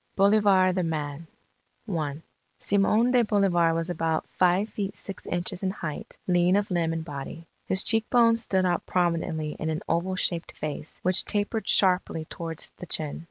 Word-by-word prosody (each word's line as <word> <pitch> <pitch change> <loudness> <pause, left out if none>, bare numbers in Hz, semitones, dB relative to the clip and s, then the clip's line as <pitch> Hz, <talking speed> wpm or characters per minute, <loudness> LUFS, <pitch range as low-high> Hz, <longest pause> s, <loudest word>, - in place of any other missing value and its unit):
BOLIVAR 200 -2 +4
THE 185 - 0
MAN 155 -1 -4 0.6
I 155 -5 -3 0.3
Simon 210 +4 +2
de 250 -1 +5
Bolivar 180 -6 +2
was 165 +2 -2
about 160 -1 -1
five 185 +3 +2
feet 205 -1 -4
six 195 - -9
inches 175 +1 -2
in 190 - 0
height, 165 -6 -6
lean 180 0 +3
of 205 -1 0
limb 170 -2 +1
and 165 -1 -3
body. 145 +2 -7 0.2
His 190 +1 +3
cheek 225 -1 +2
bones 230 -1 +4
stood 190 -4 +1
out 175 -1 0
prominently 165 -3 -1
in 160 - -2
an 160 0 -3
oval 175 +3 0
shaped 175 -2 -2
face, 150 0 -5
which 185 0 +3
tapered 210 +2 -2
sharply 180 -4 +2
towards 165 0 -5
the 180 - -9
chin. 155 -2 -1
180 Hz, 165 wpm, -26 LUFS, 165-200 Hz, 0.6 s, de